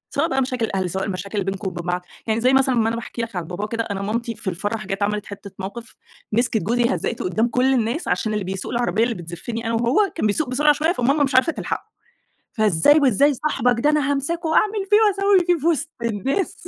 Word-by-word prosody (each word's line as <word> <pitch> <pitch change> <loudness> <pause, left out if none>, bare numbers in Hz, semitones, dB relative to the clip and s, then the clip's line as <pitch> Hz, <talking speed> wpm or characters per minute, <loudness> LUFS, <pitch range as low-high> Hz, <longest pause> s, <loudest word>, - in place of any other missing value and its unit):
سواء 290 +4 +2
بقى 265 0 +1
مشاكل 255 -3 -1
الأهل 190 -4 -2
سواء 190 +2 -2
المشاكل 200 +1 -3
بينكم 195 +1 -3
وبين 175 -1 -7
بعض، 180 0 -2 0.2
يعني 220 +1 0
زي 255 +2 +3
مثلًا 265 -1 +3
أمّا 225 -2 +2
أنا 225 - 0
باحكي 235 0 -5
لك 230 -2 -5
على 175 -2 -3
باباه 180 +5 -4
كده 230 +1 -2
أنا 200 -3 -4
مامتي 230 +3 -2
في 190 - -4
الفرح 205 +4 -3
جات 195 +1 -2
عملت 210 0 -1
حتة 200 0 -9
موقف، 225 +5 -7 0.4
مسكت 225 0 +1
جوزي 235 +2 +1
هزقته 170 - -3
قدّام 185 +6 +1
كل 255 +2 +2
الناس 245 +6 -1
عشان 215 -2 0
اللي 210 -1 -1
بيسوق 190 0 -5
العربية 235 -3 +1
اللي 235 -1 0
بتزفني 175 +7 -6
أنا 230 - -1
وهو 245 - +2
كان 270 - +1
بيسوق 250 +7 0
بسرعة 295 +4 +4
شوية 310 +3 +1
فماما 280 0 +2
مش 270 -2 -1
عارفة 260 +6 +4
تلحقه، - - -4 0.7
فإزاي 215 - +4
وإزاي 280 +1 +4
صاحبك 250 -4 0
ده 295 - +3
أنا 295 -2 +2
هامسكه 325 +5 -2
وأعمل 415 +4 +2
فيه 415 - +6
وأسوي 395 -2 +3
فيه 350 -1 +3
في 305 - -1
وِسط 325 -2 +1
الناس. 245 - -2
235 Hz, 225 wpm, -22 LUFS, 205-280 Hz, 0.7 s, فيه